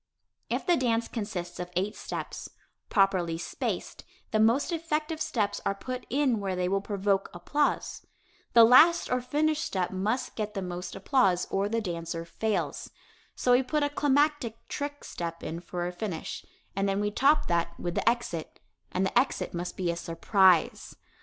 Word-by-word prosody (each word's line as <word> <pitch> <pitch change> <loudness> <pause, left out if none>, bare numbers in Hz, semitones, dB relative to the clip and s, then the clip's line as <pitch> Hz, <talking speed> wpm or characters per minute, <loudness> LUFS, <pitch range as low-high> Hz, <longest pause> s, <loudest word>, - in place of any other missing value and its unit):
If - - -1
the 350 - +4
dance 235 -3 +1
consists 205 -6 -5
of 180 0 -4
eight 195 +4 0
steps, - - -6 0.4
properly 185 -5 +2
spaced, 170 - -4 0.3
the 215 - +2
most 235 +10 +3
effective 315 -1 -2
steps 205 -4 -1
are 200 - 0
put 255 +4 -6
in 260 -4 +2
where 195 -2 -2
they 180 0 0
will 195 +1 +1
provoke 200 -1 0
applause. 290 +12 -1 0.5
The 230 - +9
last 300 +9 +6
or 250 0 +1
finish 300 +4 +1
step 185 - -1
must 210 +7 -2
get 210 -1 -4
the 195 - -2
most 180 0 -5
applause 195 -3 +2
or 195 +1 0
the 230 +1 0
dancer 165 -3 -4
fails. 175 -4 -2 0.5
So 250 - +1
we 245 +1 +6
put 295 +3 0
a 290 - +1
climactic 290 -5 +1
"trick" 290 0 -5
step 170 -1 -6
in 165 - -4
for 175 0 -4
a 175 - -2
finish, 180 -2 -5 0.3
and 195 0 +1
then 195 0 0
we 205 0 0
top 280 +7 +3
that 170 0 -1
with 175 - -3
the - - +3
exit, 235 -9 -3 0.3
and 185 +1 0
the - - -3
exit 250 +3 +1
must 175 +1 -4
be 180 -2 0
a - - -3
surprise. 180 +1 +2
205 Hz, 170 wpm, -28 LUFS, 180-255 Hz, 0.5 s, The